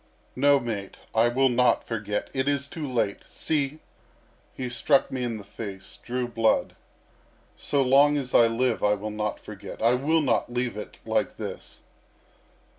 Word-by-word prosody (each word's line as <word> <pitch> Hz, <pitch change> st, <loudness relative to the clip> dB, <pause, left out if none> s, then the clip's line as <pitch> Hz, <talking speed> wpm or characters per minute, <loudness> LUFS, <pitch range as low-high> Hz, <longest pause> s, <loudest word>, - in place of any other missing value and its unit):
"No, 140 Hz, +2 st, +5 dB
mate, 110 Hz, -6 st, -5 dB, 0.2 s
I 115 Hz, +1 st, +4 dB
will 130 Hz, +3 st, +3 dB
not 125 Hz, 0 st, +3 dB
forget. 105 Hz, -3 st, -3 dB
It 130 Hz, 0 st, -1 dB
is 140 Hz, -1 st, +1 dB
too 150 Hz, -3 st, -5 dB
late. 115 Hz, -5 st, 0 dB
See! 150 Hz, -1 st, -1 dB, 0.7 s
He 130 Hz, -, -5 dB
struck 125 Hz, +4 st, +2 dB
me 130 Hz, -1 st, -2 dB
in 115 Hz, -2 st, -2 dB
the 105 Hz, -, -9 dB
face, 100 Hz, -1 st, -8 dB
drew 125 Hz, 0 st, -2 dB
blood. 115 Hz, -2 st, +1 dB, 0.8 s
So 140 Hz, -2 st, 0 dB
long 140 Hz, +3 st, +5 dB
as 130 Hz, -3 st, -4 dB
I 115 Hz, -, +7 dB
live 115 Hz, +1 st, 0 dB
I 105 Hz, 0 st, +4 dB
will 105 Hz, +1 st, -5 dB
not 105 Hz, 0 st, -3 dB
forget. 100 Hz, -2 st, -9 dB
I 115 Hz, +2 st, +4 dB
will 155 Hz, +6 st, +2 dB
not 125 Hz, -3 st, +1 dB
leave 125 Hz, -1 st, -1 dB
it 105 Hz, -, -8 dB
like -, -, 0 dB
this!" -, -, -7 dB
120 Hz, 165 wpm, -26 LUFS, 110-135 Hz, 0.8 s, I